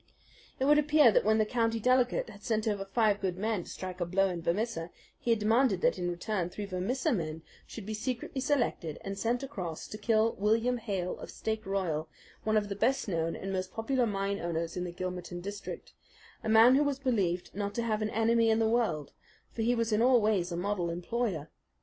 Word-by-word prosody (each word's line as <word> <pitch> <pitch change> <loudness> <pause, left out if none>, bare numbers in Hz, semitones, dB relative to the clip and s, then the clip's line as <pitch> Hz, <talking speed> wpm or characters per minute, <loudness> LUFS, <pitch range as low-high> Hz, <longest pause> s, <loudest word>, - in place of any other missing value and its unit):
It 265 - +1
would 295 +1 +6
appear 300 -4 +5
that - - +3
when 220 +1 +3
the 215 - +3
County 230 0 0
Delegate 250 -1 +2
had 200 -1 -14
sent 220 -1 0
over 205 -2 0
five 210 0 +2
good 185 -2 -1
men 210 -2 -1
to - - -11
strike 185 -1 -6
a - - +2
blow 195 +2 +2
in 175 -2 -4
Vermissa, 170 -1 -1 0.3
he - - -4
had 230 - +5
demanded 215 -2 +2
that - - +2
in 175 0 -1
return 175 +1 -2
three 205 +3 -5
Vermissa 225 - -1
men 160 -5 -3 0.2
should 220 - -8
be 215 - -4
secretly 250 +4 -3
selected 240 - 0
and 195 0 -5
sent 235 +5 -1
across 180 - -5
to 215 - -8
kill 220 +1 +2
William 225 +4 +2
Hales 195 -5 -3
of - - -8
Stake 220 -1 -4
Royal, 165 -6 -1 0.3
one 215 0 +2
of 205 -1 +1
the 200 - -4
best 235 +6 +1
known 165 -3 -1
and 195 0 -5
most 185 0 -2
popular 240 +2 0
mine 200 -1 -1
owners 170 -1 -3
in 180 - -2
the 175 - -4
Gilmerton 180 0 -5
district, 200 +3 -7 0.5
a 220 - -2
man 225 +3 +7
who 275 - +5
was 285 -2 0
believed 200 -10 0
not 200 +1 -3
to 235 - 0
have 220 -2 0
an 215 - 0
enemy 225 +1 +3
in 220 - +4
the 225 -1 +2
world; 220 - 0 0.4
for 230 - -4
he 240 +2 +2
was 230 -1 0
in 210 - +3
all 250 0 +6
ways 205 -5 +1
a 170 - -2
model 180 -2 -1
employer. 175 -2 -2
210 Hz, 215 wpm, -30 LUFS, 180-230 Hz, 0.5 s, man